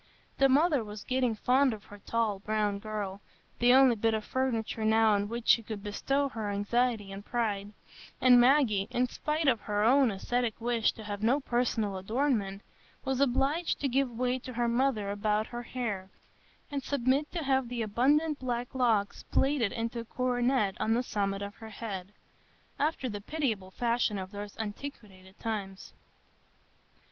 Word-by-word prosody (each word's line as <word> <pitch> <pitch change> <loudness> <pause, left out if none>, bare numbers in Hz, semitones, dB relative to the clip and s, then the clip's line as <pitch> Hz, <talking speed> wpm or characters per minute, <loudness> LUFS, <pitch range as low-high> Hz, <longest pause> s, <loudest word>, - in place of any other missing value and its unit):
The 270 0 +5
mother 290 -1 +3
was 210 -1 -8
getting 255 -3 0
fond 255 +3 +3
of 210 - -14
her 205 - -13
tall, 220 -2 -1
brown 210 -1 -1
girl,—the 210 +3 -2
only 260 -2 +6
bit 225 +1 +1
of 215 -1 -4
furniture 230 -4 -1
now 220 0 +4
on 205 0 +1
which 235 0 -4
she 230 - +6
could 215 -2 -7
bestow 275 +7 0
her 220 -5 -4
anxiety 205 +1 0
and 195 +1 -7
pride; 210 -4 -2 0.5
and 250 -1 +7
Maggie, 240 -7 +4
in 250 0 +1
spite 305 +4 -2
of 230 -5 +3
her 205 0 -1
own 260 +3 +5
ascetic 230 +3 -2
wish 235 -1 +1
to 220 - -10
have 205 -1 -5
no 245 +6 +3
personal 235 -6 0
adornment, 210 -2 -1 0.4
was 265 0 0
obliged 280 +5 +1
to 285 - +1
give 270 0 +1
way 250 +2 -1
to 255 0 -8
her 240 0 0
mother 235 -4 +1
about 210 +1 0
her 240 +1 -6
hair, 220 -6 -4 0.6
and 280 -1 -2
submit 275 +2 0
to 340 -3 -2
have 265 -3 +1
the 240 -2 -2
abundant 285 +8 +2
black 245 -1 -3
locks 225 -6 +1
plaited 270 -6 +2
into 230 +1 -3
a 230 - -6
coronet 245 -4 +1
on 225 +1 +2
the 245 - +1
summit 200 -3 -2
of 200 0 -6
her 220 -1 -9
head, 200 -3 -6 0.7
after 295 -2 0
the 205 -3 -5
pitiable 225 -8 -2
fashion 235 0 0
of 185 0 -6
those 205 0 -7
antiquated 205 -4 -8
times. 200 -4 -5
230 Hz, 165 wpm, -30 LUFS, 205-255 Hz, 0.7 s, and